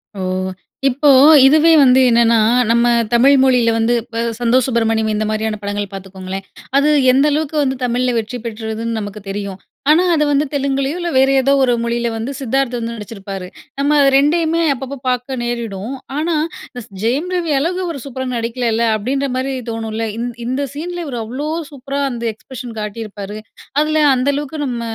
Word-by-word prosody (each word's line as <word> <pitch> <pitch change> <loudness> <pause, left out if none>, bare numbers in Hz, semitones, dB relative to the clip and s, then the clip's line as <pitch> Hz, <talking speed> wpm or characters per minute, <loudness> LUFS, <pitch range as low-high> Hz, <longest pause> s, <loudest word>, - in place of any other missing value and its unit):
ஓ! - - -7 0.7
இப்போ 285 +3 +2 0.4
இதுவே 310 +4 +5
வந்து 255 0 +5
என்னன்னா, 230 -1 +4 0.3
நம்ம 235 +1 +3 0.3
தமிழ் 265 +4 +5
மொழியில 250 -3 +3
வந்து 230 +2 +2
இப்ப 230 0 -7 0.2
"சந்தோஷ் 245 +1 +2
சுப்பிரமணியம்". 225 -2 +1
இந்த 215 +1 -1
மாரியான 215 0 -2
படங்கள் 205 0 -3
பார்த்துக்கோங்களேன். 190 0 -7 0.3
அது 290 +2 +3 0.2
எந்த 270 +3 +3
அளவுக்கு 310 +1 -1
வந்து 265 -1 0
தமிழில 250 +1 0
வெற்றி 225 +3 -3
பெற்றதுன்னு 225 0 -4
நமக்கு 205 0 -7
தெரியும். 200 -1 -5 0.3
ஆனா, 335 +4 +5
அது 300 - +2
வந்து 285 +1 +2
தெலுங்குலேயோ, 275 +1 -1
இல்ல 345 - -2
வேற 265 +1 +5
ஏதோ 275 +2 +2
ஒரு 245 -2 +3
மொழியில 235 0 -1
வந்து 235 +5 -4
சித்தார்த் 265 0 -1
வந்து 230 0 -4
நடிச்சிருப்பாரு. 195 -3 -7 0.3
நம்ம 290 +1 +3 0.2
2யுமே 325 +3 +2
அப்பப்ப 270 +2 -6
பார்க்க 250 +1 -2
நேரிடும். 235 -1 -4 0.2
ஆனா, 325 +2 0 0.4
இஸ் 235 - -8
இந்த 190 - -11
ஜெயம் 275 +10 0
ரவி 335 -4 -1
அழகு 350 +5 -1
அவரு 330 -6 -4
சூப்பரா 260 -1 -5
நடிக்கலல்ல 230 0 -1
அப்டின்ற 270 +6 -2
மாரி 270 +1 -2 0.2
தோணும்ல. 225 0 -3
இந் 240 +1 -2 0.2
இந்த 260 +3 -1
சீனில 345 +4 -5
இவரு 250 -5 -4
அவ்ளோ 270 +7 -4 0.2
சூப்பரா 275 +1 -4
அந்த 235 -1 -6
எக்ஸ்ப்ரஷன் 240 0 -9
காட்டியிருப்பாரு. 210 -1 -6 0.4
அதுல 310 0 +2
அந்த 255 +3 0
அளவுக்கு 295 +1 -4
நம்ம 240 -2 -3
245 Hz, 165 wpm, -17 LUFS, 225-280 Hz, 0.7 s, இதுவே